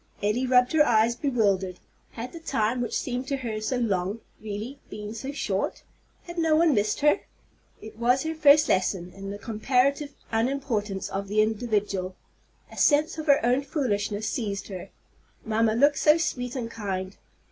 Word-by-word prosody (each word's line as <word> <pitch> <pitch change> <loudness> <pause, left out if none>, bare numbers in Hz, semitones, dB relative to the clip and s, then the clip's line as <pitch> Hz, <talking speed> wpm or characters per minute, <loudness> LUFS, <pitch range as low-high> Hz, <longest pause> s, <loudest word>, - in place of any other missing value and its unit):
Elly 230 +5 +1
rubbed 250 0 +4
her 310 -1 +6
eyes, 230 -2 +3
bewildered. 200 -9 0 0.4
Had 240 +2 -6
the 335 - -7
time 245 -6 0
which 240 - -1
seemed 250 +1 -3
to 275 - -1
her 225 -4 -4
so 250 +4 -1
long 205 -2 -1 0.2
really 220 +6 -6
been 210 0 -7
so 265 +5 -5
short? 290 - -2 0.4
Had 345 0 -6
no 320 -2 +3
one 320 -1 +4
missed 210 +3 0
her? 295 0 +4 0.6
It 220 0 -11
was 250 +3 +2
her 320 0 -2
first 300 -1 +6
lesson 185 -1 0
in 195 +1 -8
the 200 - -5
comparative 260 +7 0 0.2
unimportance 225 -5 -1
of 195 +1 -4
the 215 +2 +3
individual! 205 -4 -1 0.6
A - - -12
sense 310 +2 +3
of 315 - -5
her 280 -4 +4
own 250 +3 +3
foolishness 215 -7 -2
seized 200 -5 -3
her. 185 -3 -7 0.6
Mamma 220 0 +2
looked 285 +4 +4
so 305 +1 +5
sweet 250 -6 -2
and 235 -3 -4
kind! 190 -3 -4
230 Hz, 170 wpm, -26 LUFS, 205-275 Hz, 0.6 s, her